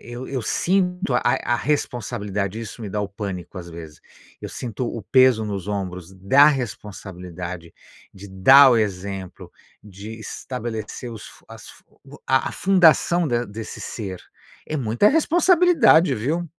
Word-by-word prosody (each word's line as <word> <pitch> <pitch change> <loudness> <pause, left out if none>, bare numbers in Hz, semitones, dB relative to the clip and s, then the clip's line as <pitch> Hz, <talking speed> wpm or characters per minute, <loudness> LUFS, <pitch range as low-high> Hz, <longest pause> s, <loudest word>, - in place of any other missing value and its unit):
eu 120 +2 -8
eu 135 -2 -3
sinto 180 - 0
a 120 - +3
a 120 -1 +1
responsabilidade, 110 -7 -3
isso 115 +1 -9
me 105 - -5
dá 105 - -2
o 100 - -3
pânico, 100 -2 -7
às 85 -1 -9
vezes, 80 -3 -11 0.4
eu - - -5
sinto 125 0 -5
o 120 - -5
o - - -8
peso 130 0 +4
nos 100 -3 -5
ombros 95 -3 -5
da 100 +10 +4
responsabilidade, 90 - -5 0.4
de 100 +1 -11
dar 130 +9 +7
o 120 - +4
exemplo, 95 -3 -4 0.3
de 105 +2 -10
estabelecer 120 0 -6
os 110 -3 -9
fun - - -17
as - - -12 0.6
a 130 0 +2
a - - -10
fundação 175 -2 +3
de 120 -3 0
desse 110 +2 -8
ser. 95 -5 -6 0.5
É 155 - -3
muita 120 - +2
responsabilidade, 325 - +4
viu? 150 +10 -2
110 Hz, 150 wpm, -22 LUFS, 100-135 Hz, 0.6 s, dar